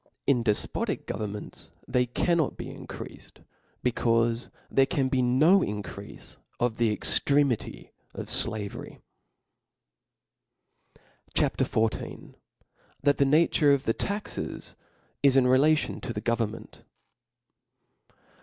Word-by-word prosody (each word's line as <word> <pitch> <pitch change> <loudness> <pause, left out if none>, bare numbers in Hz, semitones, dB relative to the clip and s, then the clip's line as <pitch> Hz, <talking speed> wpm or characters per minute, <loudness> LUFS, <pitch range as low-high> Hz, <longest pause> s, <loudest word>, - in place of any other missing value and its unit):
In 125 -4 +3
defpotic 105 -3 -1
governments 105 -1 -6 0.2
they 125 0 +1
cannot 165 +5 +1
be - - -6
increafed, - - -10 0.4
becaufe 115 -1 +1 0.2
there 135 0 +4
can 135 -2 0
be 130 -1 +1
no 145 +10 +5
increafe 105 - -6 0.2
of 120 -2 0
the 115 -2 +2
ejctremity 140 -5 +1 0.2
of - - -6
flavery. 105 -2 -2 2.4
C - - +5
HA - - +3
P. - - -1
XIV. 110 0 -2 0.7
That' 145 0 +3
the 140 - +4
Nature 150 0 +4
of 140 -1 +1
the 115 - +1
Taxes 200 - -4 0.5
is 135 -2 +5
relative 135 +4 +3
to - - -4
the. 105 - -3
Government. 115 -1 -3
125 Hz, 105 wpm, -27 LUFS, 115-140 Hz, 2.4 s, no